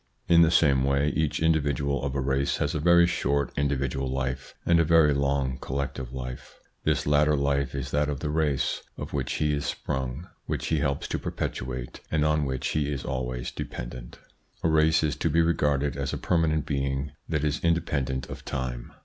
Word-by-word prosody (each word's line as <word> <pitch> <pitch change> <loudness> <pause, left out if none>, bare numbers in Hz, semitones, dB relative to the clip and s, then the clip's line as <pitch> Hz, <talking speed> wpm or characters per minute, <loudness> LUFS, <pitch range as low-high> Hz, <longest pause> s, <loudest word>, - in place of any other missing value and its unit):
In 85 0 +6
the 80 - +6
same 70 -6 +4
way 70 +2 +2
each 80 -1 0
individual 70 -4 +1
of 70 0 -2
a 70 - 0
race 70 +1 0
has - - -1
a 75 - -1
very 85 +2 +6
short 70 -5 0
individual 70 -1 -1
life 65 0 -3
and 85 -1 +4
a - - +5
very 80 -2 +5
long 70 -2 0
collective 65 -2 -4
life. 65 -1 -7 0.3
This - - +1
latter 75 +1 +4
life 70 -1 0
is 70 0 -4
that 75 0 +1
of 70 -2 -3
the 75 0 -2
race 75 -3 0 0.2
of - - -6
which 65 -3 -1
he 75 -1 +1
is 70 -1 -1
sprung, 65 +5 -3 0.2
which - - -2
he 80 - +2
helps 70 -1 -1
to - - -1
perpetuate, 60 0 -4
and 75 -1 +1
on 75 -1 +2
which 65 -1 -2
he 75 -1 0
is 70 -3 -4
always 65 -1 -3
dependent. - - -7 0.5
A 80 - +3
race 80 0 +4
is 75 -1 +1
to 85 - 0
be 80 +2 +3
regarded 75 -4 +1
as 70 -1 -3
a - - -1
permanent 80 -3 +1
being 70 0 -1 0.2
that 75 -3 0
is 75 0 -1
independent 70 -6 0
of - - -8
time. 60 -2 -4
70 Hz, 190 wpm, -27 LUFS, 65-75 Hz, 0.5 s, In